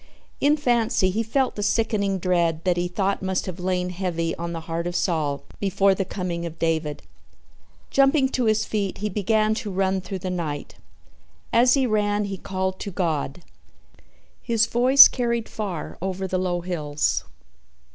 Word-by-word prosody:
In 295 Hz, +2 st, +3 dB
fancy 235 Hz, -7 st, +2 dB
he 215 Hz, +4 st, 0 dB
felt 255 Hz, +4 st, 0 dB
the 205 Hz, -, -5 dB
sickening 205 Hz, -2 st, +1 dB
dread 170 Hz, -3 st, 0 dB
that 180 Hz, -2 st, +2 dB
he 175 Hz, 0 st, -1 dB
thought 195 Hz, +2 st, -1 dB
must 190 Hz, -1 st, -1 dB
have 185 Hz, -1 st, -6 dB
lain 180 Hz, 0 st, -1 dB
heavy 170 Hz, -3 st, -2 dB
on 170 Hz, 0 st, -5 dB
the 165 Hz, -1 st, -5 dB
heart 165 Hz, +1 st, -3 dB
of 175 Hz, -, -4 dB
Saul 155 Hz, -7 st, 0 dB, 0.2 s
before 195 Hz, 0 st, +2 dB
the 190 Hz, 0 st, -2 dB
coming 175 Hz, -2 st, -4 dB
of 165 Hz, -1 st, -6 dB
David. 160 Hz, -3 st, -1 dB, 0.9 s
Jumping 275 Hz, 0 st, +4 dB
to 255 Hz, -2 st, -1 dB
his 220 Hz, 0 st, +2 dB
feet, 200 Hz, -3 st, -2 dB
he 210 Hz, +1 st, -2 dB
began 215 Hz, +2 st, +1 dB
to 215 Hz, -1 st, -4 dB
run 190 Hz, 0 st, 0 dB
through 190 Hz, +1 st, -5 dB
the 185 Hz, -, -1 dB
night. 155 Hz, -5 st, -4 dB, 0.8 s
As 245 Hz, +3 st, +5 dB
he 270 Hz, -2 st, +2 dB
ran 210 Hz, -2 st, +1 dB
he 195 Hz, -1 st, -4 dB
called 190 Hz, 0 st, -3 dB
to -, -, -5 dB
God. 170 Hz, -3 st, -2 dB, 1.0 s
His 230 Hz, -2 st, +2 dB
voice 250 Hz, +4 st, +8 dB
carried 235 Hz, -2 st, -2 dB
far 195 Hz, -7 st, -5 dB
over 190 Hz, 0 st, -3 dB
the 185 Hz, 0 st, -1 dB
low 175 Hz, -1 st, -1 dB
hills. 155 Hz, -4 st, -1 dB
190 Hz, 165 wpm, -24 LUFS, 175-215 Hz, 1.0 s, voice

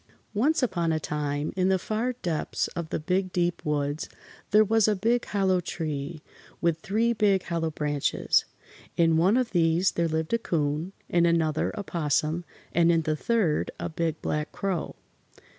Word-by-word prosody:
Once 270 Hz, +8 st, +2 dB
upon 175 Hz, -8 st, +1 dB
a 160 Hz, -, +1 dB
time 145 Hz, 0 st, -2 dB
in 185 Hz, 0 st, +2 dB
the 190 Hz, -, +4 dB
far 220 Hz, +6 st, -2 dB
depths 165 Hz, -4 st, -1 dB
of 170 Hz, -3 st, -5 dB
the -, -, -2 dB
Big 185 Hz, +4 st, 0 dB
Deep 175 Hz, -1 st, 0 dB
Woods 145 Hz, 0 st, -1 dB, 0.4 s
there 215 Hz, +1 st, +6 dB
was 220 Hz, 0 st, +3 dB
a 210 Hz, -, +3 dB
big 230 Hz, +5 st, +1 dB
hollow 190 Hz, -2 st, +1 dB
tree, 155 Hz, -2 st, -4 dB, 0.4 s
with 170 Hz, -2 st, +1 dB
three 220 Hz, +6 st, +1 dB
big 200 Hz, -4 st, +2 dB
hollow 165 Hz, -2 st, -1 dB
branches. 150 Hz, -2 st, +1 dB, 0.5 s
In 165 Hz, -1 st, +4 dB
one 185 Hz, +8 st, +4 dB
of 255 Hz, -2 st, 0 dB
these 170 Hz, +1 st, +3 dB
there 170 Hz, 0 st, 0 dB
lived 160 Hz, +4 st, -2 dB
a 230 Hz, -, +3 dB
'Coon, 155 Hz, -2 st, -1 dB, 0.2 s
in 170 Hz, -1 st, +3 dB
another 160 Hz, -2 st, +1 dB
a 205 Hz, -, -4 dB
'Possum 160 Hz, 0 st, 0 dB, 0.3 s
and 170 Hz, 0 st, +4 dB
in 165 Hz, -1 st, +2 dB
the 155 Hz, 0 st, 0 dB
third 195 Hz, -3 st, +1 dB
a -, -, -3 dB
Big 160 Hz, -1 st, -2 dB
Black 150 Hz, 0 st, -2 dB
Crow. 190 Hz, -5 st, -3 dB
170 Hz, 170 wpm, -27 LUFS, 155-195 Hz, 0.5 s, there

